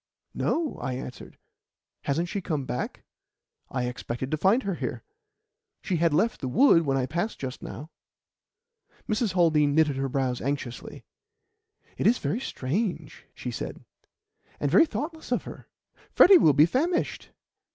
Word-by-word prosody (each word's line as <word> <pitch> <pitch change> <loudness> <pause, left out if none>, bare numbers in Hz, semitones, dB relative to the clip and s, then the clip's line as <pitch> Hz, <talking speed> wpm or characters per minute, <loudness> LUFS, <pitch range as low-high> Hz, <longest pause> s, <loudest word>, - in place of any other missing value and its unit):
"No," 320 -3 -1
I 130 - -2
answered. 130 0 -8 0.7
"Hasn't 160 +5 0
she 200 +2 -3
come 150 -6 -2
back? 125 - -4 0.7
I 125 -1 -2
expected 125 +1 -5
to - - +2
find 200 - +3
her 195 - -1
here. 125 -7 -4 0.8
She 180 - -1
had 165 0 +2
left 210 +10 +1
the 135 - -2
wood 165 - +4
when 135 0 +2
I 130 - +1
passed 175 - -3
just 130 -2 -6
now." 150 +5 -8 1.2
Mrs. 215 -2 0
Haldean 155 -5 +3
knitted 155 -4 +3
her 135 0 -1
brows 130 -2 -1
anxiously. 135 -3 -5 0.9
"It - - +3
is 240 +3 +4
very 150 - -2
strange," 190 - -3
she - - -5
said, - - -6 0.7
"and - - -1
very 330 - +6
thoughtless 315 +2 -5
of - - +1
her. - - -10 0.5
Freddy 375 -1 +8
will 150 - +5
be 150 +2 +6
famished." 320 - -1
155 Hz, 150 wpm, -26 LUFS, 135-215 Hz, 1.2 s, Freddy